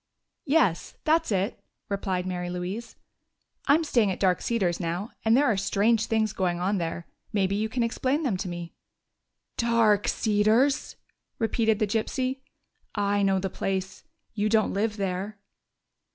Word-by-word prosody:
"Yes, 270 - +2
that's 320 -3 +2
it," 195 0 -1 0.2
replied 190 -2 -2
Mary 180 -1 -3
Louise. 185 +6 -5 0.7
"I'm 300 +4 +5
staying 235 -9 +2
at 185 - -3
Dark 185 -2 +2
Cedars 190 -8 0
now, 175 +5 -3
and 225 +2 +4
there 290 - +4
are 225 - +3
strange 215 +4 +2
things 220 -2 +1
going 175 -2 -1
on 190 +2 0
there. 170 0 -3 0.3
Maybe 195 -1 +1
you 215 +2 -1
can 245 +1 0
explain 260 +6 0
them." 245 -9 +1 1.2
"Dark 230 -3 +3
Cedars!" 220 +6 +2 0.4
repeated 225 -1 +1
the 215 - +2
gypsy. 255 +5 -1 0.6
"I 205 -1 +1
know 195 -1 +3
the 190 0 -2
place.... 190 0 -3 0.3
You 215 0 0
don't 220 -1 +2
live 215 +2 -1
there?" 195 +2 -3
210 Hz, 140 wpm, -27 LUFS, 190-230 Hz, 1.2 s, I'm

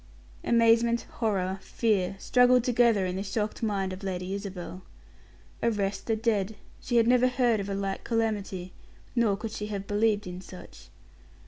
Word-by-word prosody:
Amazement, 235 0 +3
horror, 195 -4 0
fear, 200 -5 0
struggled 250 +3 +4
together 235 -5 +3
in 180 0 -2
the - - -2
shocked 210 +2 -3
mind 195 -4 -1
of 185 - -8
Lady 185 -1 -3
Isabel. 190 -2 -6 0.8
Arrest 200 -4 -1
the 225 - +2
dead. 220 -2 0 0.2
She 245 - -3
had 230 - +5
never 250 +1 +5
heard 245 -3 +2
of 200 0 -4
a 195 - -2
like 195 -1 -3
calamity: 205 -5 -2 0.4
nor 225 -5 +2
could 220 +1 -5
she 210 -1 -5
have 200 -2 -4
believed 210 0 +1
in 180 0 -7
such. 185 -1 -12
210 Hz, 155 wpm, -28 LUFS, 195-230 Hz, 0.8 s, had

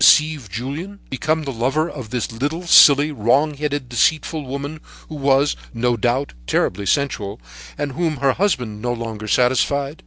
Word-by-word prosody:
deceive 150 -7 +4
Julien? 145 - -6
become 155 +4 -1
the 135 -2 -4
lover 135 +7 0
of 130 -9 -8
this 120 0 -3
little, 145 +9 -3
silly, 150 -2 +7
wrong 140 +5 +2
headed, 145 -2 -3
deceitful 155 +5 +1
woman, 140 +3 -6 0.3
who - - -8
was, 140 0 +2 0.2
no 120 +1 +1
doubt, 120 +5 -1
terribly 100 +2 0
sensual, 105 - -1 0.4
and 145 -1 -3
whom 160 +1 -1
her 135 0 +2
husband 125 - -1
no 120 +1 -1
longer 110 -2 -6
satisfied. 135 +5 +1
140 Hz, 155 wpm, -20 LUFS, 120-150 Hz, 0.4 s, silly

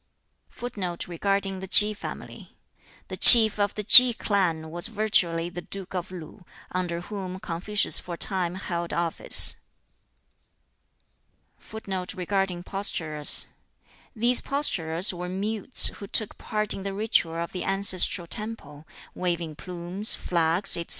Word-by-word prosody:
[Footnote 190 -8 -7
4: 175 -1 -10 0.2
The 190 -1 -8
Chief 215 +1 +4
of 205 0 -2
the 210 - -5
Ki 245 +3 +9
clan 170 -8 -3
was 175 +4 -3
virtually 195 -6 -1
the 175 0 -9
Duke 195 +1 -10
of 180 -1 -6
Lu, 180 +1 -12 0.3
under 175 -2 -4
whom 185 -1 -8
Confucius 190 +5 -2
for 175 - -9
a - - -17
time 180 -2 -1
held 175 -3 -6
office.] 170 -1 +3 2.0
[Footnote 190 -4 -8
5: 180 -4 0 0.7
These 240 +2 +3
posturers 180 - -1
were 180 0 -8
mutes 210 +6 +3
who 200 - -12
took 215 +1 -3
part 215 -1 -4
in - - -8
the 195 0 -6
ritual 205 -6 -1
of 170 0 -6
the 185 - -7
ancestral 195 -2 0
temple, 165 -7 -8 0.3
waving 170 -3 -5
plumes, 180 +5 -4
flags, 170 +2 -1
etc. 170 - -7
185 Hz, 120 wpm, -24 LUFS, 170-205 Hz, 2.0 s, Ki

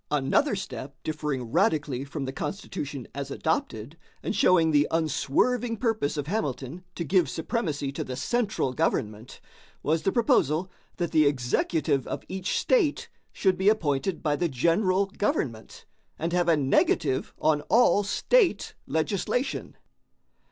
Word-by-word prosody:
Another 150 - +2
step 135 - -6
differing 150 -6 -3
radically 145 -4 +1
from 140 0 -5
the 130 - -5
Constitution 150 - -5
as 140 0 -5
adopted, 140 -2 -2 0.2
and - - -2
showing 165 -3 +4
the 145 -1 +4
unswerving 215 - +1
purpose 220 - -1
of 145 - -2
Hamilton 150 - -3
to 170 - -3
give 175 -2 +2
supremacy 160 - -2
to 140 - -4
the 130 - -6
central 215 - -1
government, 110 -7 -2 0.4
was 155 +2 +1
the 195 - +1
proposal 185 - +2 0.3
that 175 -2 -2
the 155 -2 +4
executive 140 +1 0
of - - -4
each 190 0 -2
state 390 -13 +1 0.2
should 190 -2 +1
be 190 +2 +5
appointed 165 -4 0
by 150 -2 +1
the 170 +3 0
general 185 - +2
government 195 - -3 0.3
and 165 +2 -2
have 175 -1 +2
a 165 - +4
negative 135 -1 +1
on 150 -2 +2
all 225 -3 +5
state 370 - +2
legislation. 195 - -2
160 Hz, 135 wpm, -27 LUFS, 140-195 Hz, 0.4 s, be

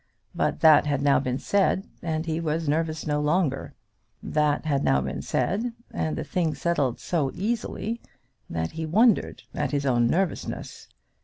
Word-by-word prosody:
But - - -1
that 155 -2 +7
had 140 -1 0
now 140 -1 +5
been 130 -1 -1
said, 195 +3 +1
and 160 -1 -2
he 160 -1 -1
was 160 -1 -1
nervous 160 +1 0
no 150 -1 0
longer. 150 -2 0 0.5
That 150 0 +1
had 140 -3 +1
now 65 - +3
been 65 +1 -4
said, 225 +6 -1 0.2
and 80 -2 -2
the - - -2
thing 165 -4 -1
settled 145 -8 0
so 155 -6 0
easily, 225 +2 -2 0.5
that 80 0 -2
he 160 0 -4
wondered 220 +6 +3
at - - -1
his 140 0 -1
own 120 -3 +3
nervousness. 180 +5 -2
155 Hz, 160 wpm, -26 LUFS, 140-175 Hz, 0.5 s, that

